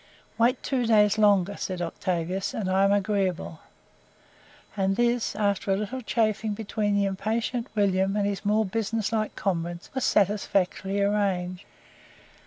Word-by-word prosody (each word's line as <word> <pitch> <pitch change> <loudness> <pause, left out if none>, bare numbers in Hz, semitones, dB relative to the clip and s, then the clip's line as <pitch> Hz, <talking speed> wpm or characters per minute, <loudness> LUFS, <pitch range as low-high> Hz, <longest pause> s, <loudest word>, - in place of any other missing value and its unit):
"Wait 235 +2 +2
two 250 -4 0
days 210 -1 +4
longer," 200 -2 +3
said 185 -2 -4
Octavius 175 +2 -2
"and 205 - -2
I 190 +1 +4
am 195 - +3
agreeable." 195 -5 -1 1.2
And 195 -1 +1
this, 240 0 +1
after 200 -2 0
a - - +4
little 215 +6 -4
chaffing 215 -1 0
between 210 -1 -1
the 200 0 +2
impatient 225 +5 -2
William 195 -1 +2
and 205 - +1
his 200 -1 -2
more 215 +1 +2
business 220 +1 -2
like 215 -1 -1
comrades, 175 -3 -3
was 265 -2 -2
satisfactorily 200 -1 +1
arranged. 195 -3 -1
200 Hz, 140 wpm, -26 LUFS, 190-215 Hz, 1.2 s, days